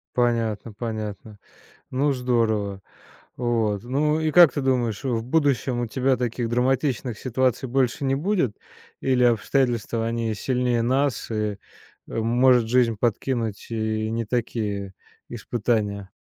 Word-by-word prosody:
Понятно, 115 Hz, -3 st, 0 dB
понятно. 110 Hz, -2 st, -6 dB, 0.5 s
Ну 140 Hz, +2 st, +1 dB
здорово. 110 Hz, -6 st, 0 dB, 0.6 s
Вот, 115 Hz, -5 st, 0 dB
ну 150 Hz, +5 st, +1 dB
и 155 Hz, -1 st, 0 dB
как 175 Hz, -2 st, +7 dB
ты 145 Hz, -, -2 dB
думаешь, 125 Hz, -5 st, 0 dB
э, 135 Hz, -, -1 dB
в 115 Hz, -2 st, -1 dB
будущем 130 Hz, -3 st, +1 dB
у 120 Hz, -, -2 dB
тебя 130 Hz, +3 st, +1 dB
таких 120 Hz, -1 st, -2 dB
драматичных 125 Hz, -1 st, 0 dB
ситуаций 130 Hz, 0 st, 0 dB
больше 130 Hz, +1 st, 0 dB
не 135 Hz, -, +2 dB
будет, 155 Hz, -, 0 dB, 0.5 s
или 130 Hz, -2 st, +2 dB
обстоятельства, 120 Hz, -1 st, +1 dB
они 115 Hz, -1 st, -1 dB
сильнее 125 Hz, +1 st, 0 dB
нас, 135 Hz, +2 st, 0 dB
и, -, -, -2 dB
э, 105 Hz, -2 st, -1 dB, 0.5 s
может, 120 Hz, +1 st, +3 dB
жизнь 120 Hz, -2 st, +3 dB
подкинуть 115 Hz, -1 st, -1 dB
и 110 Hz, -1 st, -1 dB
не 115 Hz, +1 st, -1 dB
такие 105 Hz, -4 st, -2 dB, 0.3 s
испытания? 105 Hz, -4 st, -2 dB
120 Hz, 130 wpm, -24 LUFS, 110-130 Hz, 0.6 s, как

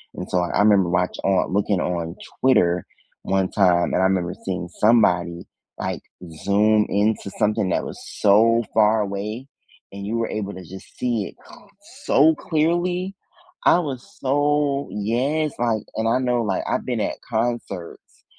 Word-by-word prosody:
and -, -, -6 dB
so 90 Hz, -, +1 dB
I 90 Hz, +2 st, -1 dB
remember 100 Hz, -4 st, +4 dB
watch 90 Hz, +1 st, 0 dB
on 95 Hz, -1 st, +1 dB
looking 100 Hz, -2 st, +1 dB
on 85 Hz, -1 st, -3 dB, 0.3 s
Twitter 90 Hz, -9 st, +3 dB, 0.4 s
one 95 Hz, -1 st, 0 dB
time 90 Hz, -4 st, +3 dB
and -, -, +2 dB
I -, -, +4 dB
remember 90 Hz, -2 st, 0 dB
seeing 90 Hz, -2 st, -3 dB
somebody, 90 Hz, -6 st, +2 dB, 0.3 s
like, -, -, -3 dB, 0.4 s
zoom 105 Hz, +1 st, +3 dB
into 105 Hz, 0 st, 0 dB
something 105 Hz, -2 st, +1 dB
that -, -, 0 dB
was -, -, -8 dB, 0.2 s
so 115 Hz, +3 st, +5 dB
far 110 Hz, 0 st, +4 dB
away 105 Hz, +5 st, -4 dB, 0.5 s
and 100 Hz, 0 st, -7 dB
you 110 Hz, +3 st, -2 dB
were 115 Hz, -, -1 dB
able 100 Hz, -2 st, -4 dB
to 95 Hz, 0 st, -9 dB
just 95 Hz, +3 st, -12 dB
see 120 Hz, -5 st, -1 dB
it -, -, -13 dB
cl -, -, -16 dB, 0.4 s
so 155 Hz, +3 st, +5 dB
clearly. 175 Hz, +5 st, 0 dB, 0.5 s
I 175 Hz, -, +6 dB
was 135 Hz, -7 st, -4 dB, 0.2 s
so, 145 Hz, +1 st, +1 dB
yes, 130 Hz, +9 st, 0 dB
like, 115 Hz, -3 st, 0 dB
and 110 Hz, 0 st, -1 dB
I 120 Hz, +3 st, +2 dB
know, 125 Hz, -2 st, +1 dB
like, 100 Hz, -3 st, -1 dB
I've -, -, -1 dB
been -, -, -1 dB
at -, -, -1 dB
concerts 110 Hz, -6 st, -4 dB
105 Hz, 160 wpm, -22 LUFS, 95-125 Hz, 0.5 s, I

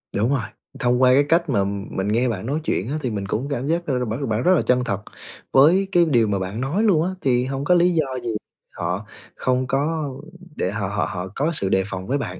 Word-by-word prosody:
Đúng 110 Hz, +4 st, +1 dB
rồi. 135 Hz, -, +1 dB, 0.4 s
Thông 125 Hz, +1 st, +2 dB
qua 125 Hz, -1 st, +6 dB
cái 140 Hz, +2 st, +5 dB
cách 170 Hz, -1 st, +3 dB
mà, 105 Hz, -, +2 dB
ừm, 100 Hz, 0 st, -2 dB
mình 95 Hz, +1 st, -2 dB
nghe 120 Hz, +4 st, +2 dB
bạn 105 Hz, -5 st, -4 dB
nói 145 Hz, +4 st, -1 dB
chuyện 105 Hz, -, -1 dB
á, 155 Hz, -, -1 dB
thì 125 Hz, -, -1 dB
mình 100 Hz, -2 st, -3 dB
cũng 115 Hz, +8 st, -2 dB
cảm 140 Hz, -1 st, -2 dB
giác 165 Hz, +2 st, +1 dB
rà 140 Hz, -, 0 dB
rà 125 Hz, -, -1 dB
bạn 120 Hz, +4 st, -3 dB
bạn 110 Hz, +2 st, 0 dB
rất 185 Hz, -, +5 dB
là -, -, +2 dB
chân 125 Hz, 0 st, +2 dB
thật 100 Hz, -4 st, -3 dB, 0.5 s
với 175 Hz, +9 st, +5 dB
cái 175 Hz, -2 st, +5 dB
điều 120 Hz, -8 st, +3 dB
mà 100 Hz, -1 st, 0 dB
bạn 95 Hz, +5 st, -4 dB
nói 160 Hz, +11 st, 0 dB
luôn 180 Hz, -8 st, +4 dB
á, 185 Hz, -, -1 dB
thì 125 Hz, -2 st, +2 dB
hổng 135 Hz, +1 st, -3 dB
có 180 Hz, -, +3 dB
lý 175 Hz, +1 st, +4 dB
do 160 Hz, -3 st, +2 dB, 0.2 s
gì 120 Hz, -, -2 dB, 0.4 s
họ 90 Hz, +5 st, -3 dB, 0.3 s
không 130 Hz, 0 st, 0 dB
có 145 Hz, +2 st, -1 dB, 0.4 s
để 95 Hz, -, -1 dB
họ 105 Hz, -2 st, -2 dB
họ 105 Hz, -, -1 dB
họ 90 Hz, 0 st, -4 dB
có 150 Hz, +4 st, 0 dB
sự 100 Hz, -11 st, -2 dB
đề 95 Hz, 0 st, +2 dB
phòng 95 Hz, -1 st, -6 dB
với 140 Hz, -, +1 dB
bạn. 140 Hz, -, -5 dB
125 Hz, 260 wpm, -22 LUFS, 105-150 Hz, 0.5 s, qua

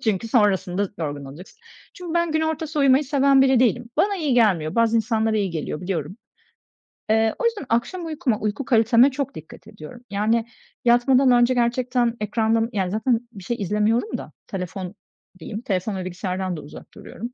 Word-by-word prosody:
çünkü 220 Hz, +1 st, 0 dB
sonrasında 200 Hz, -4 st, +1 dB
yorgun 145 Hz, -3 st, -4 dB
olacaksın. 155 Hz, -, -12 dB, 0.3 s
Çünkü 345 Hz, -2 st, -7 dB
ben 340 Hz, -2 st, +1 dB
gün 315 Hz, -, +1 dB
ortası 315 Hz, -1 st, -2 dB
uyumayı 275 Hz, +1 st, +4 dB
seven 275 Hz, -1 st, +4 dB
biri 265 Hz, -2 st, +4 dB
değilim. 245 Hz, -1 st, +1 dB
Bana 400 Hz, 0 st, +2 dB
iyi 295 Hz, -7 st, 0 dB
gelmiyor. 185 Hz, -10 st, +2 dB
Bazı 230 Hz, 0 st, +3 dB
insanlara 220 Hz, -1 st, +1 dB
iyi 195 Hz, -2 st, -1 dB
geliyor, 155 Hz, -1 st, -4 dB
biliyorum. 180 Hz, -1 st, -4 dB, 0.9 s
Eee, 220 Hz, 0 st, +2 dB
o 485 Hz, -, -1 dB
yüzden 455 Hz, -, -1 dB
akşam 285 Hz, +10 st, -1 dB
uykuma, 285 Hz, -8 st, -1 dB
uyku 215 Hz, +5 st, -3 dB
kaliteme 235 Hz, +2 st, +4 dB
çok 275 Hz, 0 st, -4 dB
dikkat 155 Hz, 0 st, -12 dB
ediyorum. 195 Hz, +11 st, -11 dB
Yani 220 Hz, +3 st, +1 dB, 0.4 s
yatmadan 255 Hz, +2 st, +4 dB
önce 240 Hz, +1 st, +4 dB
gerçekten 245 Hz, 0 st, 0 dB
ekrandan, 225 Hz, +2 st, 0 dB
yani 190 Hz, -3 st, -1 dB
zaten 225 Hz, +2 st, +1 dB
bir 195 Hz, -3 st, -11 dB
şey 240 Hz, +5 st, -3 dB
izlemiyorum 210 Hz, -, 0 dB
da, -, -, -9 dB, 0.2 s
telefon 185 Hz, 0 st, -6 dB, 0.4 s
diyeyim, 210 Hz, +7 st, -6 dB
telefon 195 Hz, -3 st, -2 dB
ve 185 Hz, -1 st, -4 dB
bilgisayardan 185 Hz, -1 st, -3 dB
da -, -, -7 dB
uzak 145 Hz, -, -13 dB
duruyorum. 235 Hz, +4 st, -9 dB
230 Hz, 170 wpm, -22 LUFS, 195-260 Hz, 0.9 s, uyumayı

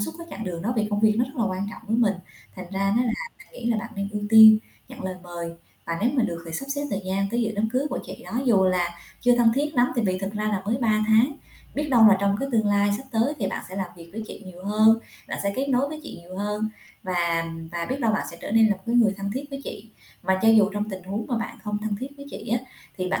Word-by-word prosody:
suốt 210 Hz, -, -2 dB
cái 335 Hz, -, -8 dB
chặng 225 Hz, -, -6 dB
đường 170 Hz, -3 st, -4 dB
đó 230 Hz, +5 st, 0 dB
vì 215 Hz, -1 st, +2 dB
công 205 Hz, 0 st, 0 dB
việc 215 Hz, -1 st, +5 dB
nó 240 Hz, -, +4 dB
rất 260 Hz, -, -12 dB
là 230 Hz, -, +1 dB
quan 190 Hz, 0 st, -2 dB
trọng 230 Hz, -, -10 dB
với 225 Hz, +1 st, +1 dB
mình. 220 Hz, -5 st, +3 dB, 0.4 s
Thành 185 Hz, -1 st, -7 dB
ra 195 Hz, 0 st, 0 dB
nó 245 Hz, -, +4 dB
là 240 Hz, -3 st, 0 dB, 0.4 s
mình -, -, -10 dB
nghĩ 235 Hz, -, 0 dB
là 230 Hz, -, +2 dB
bạn -, -, -6 dB
nên 200 Hz, 0 st, -3 dB
ưu 210 Hz, 0 st, -3 dB
tiên, 220 Hz, -1 st, +10 dB, 0.3 s
nhận 255 Hz, 0 st, -10 dB
lời 185 Hz, -1 st, -3 dB
mời 170 Hz, -1 st, -6 dB, 0.3 s
và 165 Hz, 0 st, -2 dB
nếu 245 Hz, +5 st, +3 dB
mà 255 Hz, -, +3 dB
được 170 Hz, -6 st, -2 dB
thì 165 Hz, -, -7 dB
sắp 225 Hz, +12 st, -4 dB
xếp 285 Hz, -, -2 dB
thời 195 Hz, -, -1 dB
gian 195 Hz, +1 st, 0 dB
tới 235 Hz, +1 st, +1 dB
dự 225 Hz, -1 st, -1 dB
đám 220 Hz, +2 st, +1 dB
cưới 255 Hz, +3 st, +1 dB
của 260 Hz, -, -2 dB
chị -, -, -9 dB
đó -, -, -10 dB
dù 210 Hz, -7 st, +4 dB
là 180 Hz, -2 st, +2 dB, 0.3 s
chưa 245 Hz, 0 st, +5 dB
thân 235 Hz, -2 st, +5 dB
thiết 295 Hz, +3 st, -1 dB
lắm 245 Hz, -1 st, +3 dB
tại 235 Hz, -, +2 dB
vì 185 Hz, 0 st, 0 dB
thực 195 Hz, +1 st, -4 dB
ra 210 Hz, 0 st, -3 dB
là 200 Hz, -3 st, -1 dB
mới 225 Hz, +3 st, +1 dB
3 215 Hz, -2 st, +2 dB
tháng, 220 Hz, +6 st, +4 dB, 0.4 s
biết 295 Hz, +1 st, -2 dB
đâu 235 Hz, -4 st, +7 dB
là 200 Hz, -, +6 dB
trong 200 Hz, 0 st, +2 dB
cái 275 Hz, -, -1 dB
tương 220 Hz, -2 st, +3 dB
lai 205 Hz, 0 st, +3 dB
sắp 260 Hz, -, -8 dB
tới 230 Hz, +5 st, +2 dB
thì 200 Hz, -, 0 dB
bạn -, -, -4 dB
sẽ 185 Hz, -, -8 dB
làm 190 Hz, -1 st, -1 dB
việc 170 Hz, -1 st, -12 dB
với 220 Hz, +1 st, -5 dB
chị -, -, -9 dB
nhiều 185 Hz, 0 st, -11 dB
hơn, 215 Hz, +2 st, +5 dB, 0.3 s
bạn -, -, -4 dB
sẽ 200 Hz, 0 st, 0 dB
kết 270 Hz, +2 st, 0 dB
nối 270 Hz, +1 st, +2 dB
với 310 Hz, +1 st, -7 dB
chị 310 Hz, -, -9 dB
nhiều 180 Hz, +2 st, -10 dB
hơn 210 Hz, +2 st, -1 dB, 0.3 s
và 170 Hz, -2 st, 0 dB, 0.3 s
và 170 Hz, -1 st, -2 dB
biết 260 Hz, -, 0 dB
đâu 230 Hz, -3 st, +2 dB
bạn 215 Hz, -, -1 dB
sẽ 170 Hz, -, -10 dB
trở -, -, -6 dB
nên 225 Hz, +1 st, +6 dB
là 205 Hz, -, +2 dB
một 190 Hz, -, -22 dB
cái 235 Hz, -, 0 dB
người 225 Hz, -5 st, +5 dB
thân 200 Hz, 0 st, -3 dB
thiết 265 Hz, +5 st, -3 dB
với 275 Hz, 0 st, -5 dB
chị. 220 Hz, +2 st, -8 dB, 0.3 s
Và 190 Hz, 0 st, +2 dB
cho 225 Hz, -, +5 dB
dù 215 Hz, -3 st, +6 dB
trong 210 Hz, +1 st, -2 dB
tình 185 Hz, -2 st, -7 dB
huống 205 Hz, +4 st, -4 dB
mà 245 Hz, -, 0 dB
bạn 230 Hz, -, -5 dB
không 210 Hz, -1 st, -1 dB
thân 210 Hz, -1 st, -2 dB
thiết 260 Hz, +6 st, -5 dB
với 280 Hz, -, -10 dB
chị -, -, -8 dB
á 235 Hz, +2 st, +2 dB, 0.4 s
thì 185 Hz, 0 st, -1 dB
bạn 190 Hz, -, 0 dB
215 Hz, 305 wpm, -25 LUFS, 195-235 Hz, 0.4 s, tiên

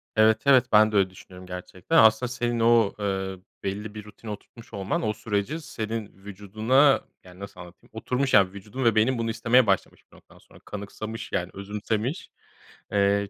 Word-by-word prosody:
Evet, 110 Hz, 0 st, +4 dB
evet, 130 Hz, -3 st, +6 dB
ben 110 Hz, 0 st, +6 dB
de -, -, -4 dB
öyle 95 Hz, -2 st, +3 dB
düşünüyorum 90 Hz, 0 st, -13 dB
gerçekten. 90 Hz, -, -3 dB
Aslında 110 Hz, +1 st, +5 dB
senin 120 Hz, -1 st, -2 dB
o, 115 Hz, -2 st, +4 dB
eee, 95 Hz, -1 st, -2 dB, 0.3 s
belli 105 Hz, +2 st, -4 dB
bir 105 Hz, -1 st, -8 dB
rutine 105 Hz, +1 st, -10 dB
oturtmuş 110 Hz, +3 st, -11 dB
olman 100 Hz, 0 st, -2 dB
o 105 Hz, -1 st, -1 dB
süreci 110 Hz, +10 st, -3 dB
senin 110 Hz, -5 st, -5 dB
vücuduna 110 Hz, +8 st, +2 dB, 0.2 s
yani, 90 Hz, 0 st, -15 dB
nasıl 100 Hz, -2 st, -10 dB
anlatayım, 85 Hz, 0 st, -13 dB
oturmuş 125 Hz, +4 st, -2 dB
ya 100 Hz, -2 st, +6 dB
vücudun 105 Hz, +6 st, -7 dB
ve 115 Hz, -, +4 dB
beynin 115 Hz, +4 st, +3 dB
bunu 115 Hz, 0 st, -2 dB
istemeye 115 Hz, +2 st, +3 dB
başlamış 95 Hz, -2 st, -2 dB
bir -, -, -18 dB
noktadan -, -, -20 dB
sonra. -, -, -19 dB
Kanıksamış 110 Hz, +3 st, -7 dB
yani 90 Hz, 0 st, -1 dB
özümsemiş, 105 Hz, -, -3 dB, 0.6 s
eee, 100 Hz, 0 st, +2 dB
110 Hz, 170 wpm, -25 LUFS, 100-115 Hz, 0.6 s, evet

